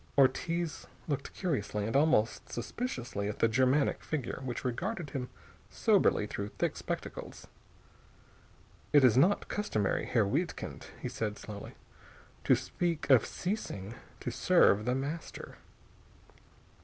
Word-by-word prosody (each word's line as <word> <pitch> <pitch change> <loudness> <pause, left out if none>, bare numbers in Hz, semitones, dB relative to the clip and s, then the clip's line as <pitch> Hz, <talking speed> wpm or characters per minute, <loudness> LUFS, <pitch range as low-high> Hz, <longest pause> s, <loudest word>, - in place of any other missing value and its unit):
Ortiz 165 +4 +2 0.2
looked 140 -3 -2
curiously 105 - -1
and 115 - -2
almost 140 -6 +2
suspiciously 120 - -3
at 105 - -4
the - - +4
Germanic 130 +5 +2
figure 145 -5 -3
which 125 -1 -4
regarded 170 - -2
him 125 -2 -4 0.4
soberly - - +3
through 100 - -4
thick - - 0
spectacles. - - -6 1.5
"It 145 -2 +7
is 120 -4 +6
not 180 +10 +4
customary, 110 - -1
Herr 115 -4 +3
Wiedkind," 150 - -2
he - - -4
said 105 -2 -3
slowly, 105 -1 -8 0.7
"to - - +6
speak 170 -5 -1
of 125 -5 +6
ceasing 115 - -4 0.3
to - - -3
serve 105 +2 +4
The 125 +1 +1
Master." 145 +5 -5
130 Hz, 120 wpm, -31 LUFS, 110-160 Hz, 1.5 s, It